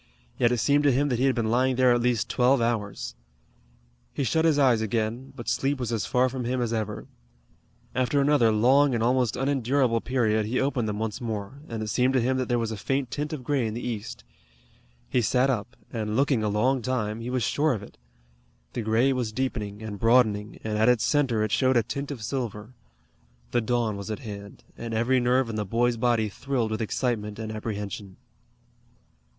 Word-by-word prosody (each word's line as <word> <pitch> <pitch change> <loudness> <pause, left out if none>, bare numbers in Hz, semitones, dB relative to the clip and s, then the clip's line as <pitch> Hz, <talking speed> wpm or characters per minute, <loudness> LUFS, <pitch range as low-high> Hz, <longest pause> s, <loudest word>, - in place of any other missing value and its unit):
Yet 120 -1 +4
it 125 - +1
seemed 145 +5 +3
to 140 - +6
him 140 +3 +1
that 120 -3 0
he 130 - +3
had 135 - +2
been 115 -2 0
lying 130 +2 +2
there 125 -1 +4
at 120 - +1
least 120 -2 +1
twelve 130 +2 +3
hours. 105 - -2 1.0
He - - -2
shut 160 +5 +1
his 160 -3 +4
eyes 125 -6 +4
again, 115 +4 -2
but 120 -4 -9
sleep 135 +4 0
was 120 -2 -2
as 110 -5 -1
far 125 +1 +3
from 130 0 -4
him 125 +2 -1
as 120 -2 -1
ever. 110 -2 -3 0.9
After 130 +3 +1
another 140 -5 +4
long 130 +5 +4
and 115 - 0
almost 125 -2 +2
unendurable 130 -3 +1
period 110 -4 +1
he 125 +4 0
opened 130 -5 0
them 105 - -3
once 110 +1 -3
more, 110 +3 -5
and 115 -2 -4
it 105 - -4
seemed 125 +4 +2
to - - +4
him 130 +2 +1
that 130 -2 -2
there 120 - +2
was 115 -1 -1
a 110 - -4
faint 135 +5 -2
tint 150 +1 -3
of 150 -5 -5
gray 130 -3 0
in 110 - -4
the 120 - -4
east. 120 +1 -5 0.8
He 125 - +1
sat 125 +4 +2
up, 120 0 -4 0.2
and 110 -2 -2
looking 135 -2 +2
a 105 - 0
long 125 +6 +1
time, 110 -3 -2
he 120 - -5
was 125 -2 0
sure 150 +6 +2
of 105 -4 -5
it. - - -14 0.7
The - - -2
gray 115 +5 +2
was 125 -4 -2
deepening 110 -4 -3
and 105 -2 -6
broadening, 115 -3 +3
and 105 -1 -2
at 110 +3 +5
its 125 -3 +3
center 130 -7 +2
it 110 - -2
showed 130 +1 +3
a 115 - +3
tint 140 +5 -5
of 130 -7 -6
silver. 115 -2 -4 0.8
The 120 - +2
dawn 115 -2 0
was 100 +1 -7
at 110 - -2
hand, 100 -4 -9
and 115 -1 -5
every 125 +3 +2
nerve 125 +1 +2
in 110 -1 -4
the 105 - 0
boy's 120 +4 +1
body 115 -2 +2
thrilled 120 +1 -2
with 110 - -2
excitement 110 -2 -2
and 110 -1 -5
apprehension. 105 -3 -5
120 Hz, 210 wpm, -26 LUFS, 110-130 Hz, 1.0 s, to